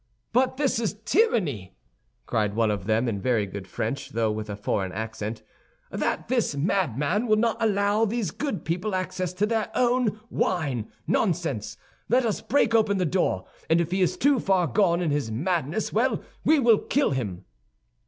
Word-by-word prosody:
"But 255 +1 +2
this 270 -5 +1
is 215 -3 -1
tyranny!" 155 - +1 0.5
cried 105 -2 0
one 115 -1 +2
of 100 -2 -4
them, 110 +3 +2
in 100 -4 -2
very 115 -4 +1
good 95 -1 -8
French, 140 +6 -3
though 110 -1 0
with 105 0 -5
a 105 - -3
foreign 100 -2 -2
accent, 110 +1 -5 0.5
"that - - -2
this 240 - 0
madman 160 - 0
will 215 - +4
not 225 +1 +2
allow 205 0 +2
these 220 -5 -2
good 280 - -4
people 180 +5 -1
access 185 -1 -2
to 190 +3 +1
their 220 -1 -1
own 245 -3 +2
wine! 140 - -1
Nonsense, 135 - -1 0.3
let 250 +1 +3
us 220 - -1
break 235 -2 +2
open 215 -3 +3
the 185 - +1
door, 155 - 0 0.2
and 165 +1 +4
if 170 0 -1
he 190 +1 +1
is 180 0 +1
too 280 -1 +3
far 190 -4 +2
gone 170 - +2
in 160 - 0
his 145 -5 -1
madness, 160 - -1
well, 245 +5 +1 0.2
we 315 - +5
will 235 -6 +5
kill 285 +1 +1
him!" 105 -10 -3
180 Hz, 175 wpm, -26 LUFS, -, 0.5 s, we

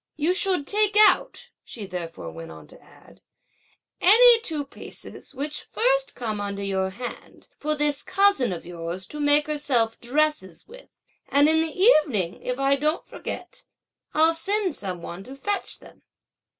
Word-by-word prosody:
"You 315 +4 +1
should 370 -6 +2
take 420 +3 +1
out," 485 +3 +3
she 215 -4 -8
therefore 170 - -6
went 80 0 -9
on 80 -1 -12
to - - -15
add, - - -20 0.8
"any 465 +4 +7
two 310 -9 -3
pieces 280 - -10
which 290 +3 -5
first - - +1
come 215 -4 -4
under 200 0 -4
your 190 -1 -1
hand, 240 +6 -9
for 305 +1 -1
this 295 -1 +1
cousin 395 - +2
of 175 - -6
yours 170 +2 -6
to 300 - -9
make 290 0 +3
herself 265 -7 0
dresses 255 - -1
with; - - -15 0.3
and 285 +1 +4
in 320 +1 +4
the 320 +1 -3
evening, 285 - +3
if 250 0 -3
I 275 0 +2
don't 305 +4 -1
forget, - - -7 0.5
I'll 320 +2 +4
send 390 +2 -1
some 185 -8 -4
one 175 +3 -7
to 265 - -10
fetch 405 +8 -3
them." - - -17
290 Hz, 160 wpm, -24 LUFS, -, 0.8 s, any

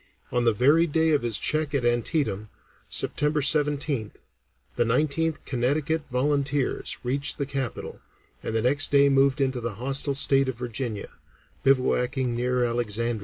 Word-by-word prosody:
On 120 -1 0
the 115 - +5
very 145 +10 +3
day 160 +1 +2
of 150 - +2
his 115 -3 -1
check 155 +1 -1
at 130 -4 0
Antietam, 120 - -1 0.4
September 150 +1 0
17th, 145 -5 0 0.6
the 120 - +2
Nineteenth 150 +6 0
Connecticut 145 +5 -1
Volunteers 140 +1 0
reached 140 +3 0
the 140 - -2
capital, 135 -3 -5 0.4
and 110 - -4
the 110 - +1
next 145 +5 +2
day 140 0 +5
moved 135 +1 +3
into 130 -2 0
the 115 -3 -4
hostile 135 +4 0
state 135 -1 +3
of 125 - -5
Virginia, 120 -3 -4 0.5
bivouacking 130 -1 +1
near 125 +1 0
Alexandria. 115 -1 -1
135 Hz, 145 wpm, -25 LUFS, 120-145 Hz, 0.6 s, the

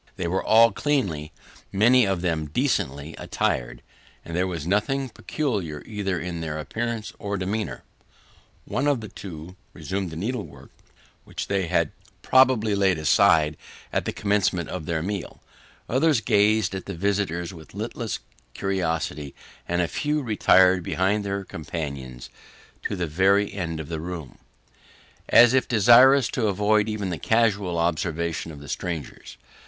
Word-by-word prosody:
They 90 - -4
were 95 +3 -1
all 115 +1 +6
cleanly 95 - -1 0.4
many 120 +4 +5
of 95 -3 -1
them 80 -4 -1
decently 75 - -1
attired, - - -2 0.4
and 85 - -6
there 90 +2 +1
was 85 -5 -4
nothing 130 +9 0
peculiar, 105 - -3
either 100 -4 -2
in 85 -1 -5
their 80 -1 -4
appearance 110 - -4
or 100 0 -3
demeanour. 100 +4 -3 0.8
One 145 - -1
or 145 -2 +3
two 90 -5 -9 0.2
resumed 95 -1 -4
the 80 - -8
needlework 85 - -5 0.5
which - - -6
they 95 -3 0
had 85 -3 +1 0.3
probably 130 -5 +4
laid 95 -3 +2
aside 75 0 +4 0.4
at - - 0
the - - -1
commencement 100 -1 0
of 75 - -5
their 80 -2 -1
meal; 100 0 -5 0.5
others 140 +1 +3
gazed 110 -1 +2
at 95 - -6
the 95 - -5
visitors 95 -2 -1
with 80 +1 -13
listless 110 +1 -4 0.4
curiosity; 80 -7 -2 0.3
and 85 0 +1
a - - -1
few 150 - -1
retired 95 -5 +4
behind 95 +5 0
their 100 0 -3
companions 70 -8 -6 0.5
to - - -3
the 90 -2 -2
very 95 +5 +2
end 85 -4 -4
of 80 - -6
the 80 -1 -4
room, 85 -5 -7 0.9
as 120 0 +7
if 130 - +2
desirous 120 +4 +6
to 115 -4 0
avoid 105 +2 +2
even 105 -3 -3
the 85 - -4
casual 105 -4 +1
observation 85 -1 -1
of 75 - -10
the 70 - -11
strangers. 80 -2 -5
95 Hz, 145 wpm, -24 LUFS, 80-110 Hz, 0.9 s, as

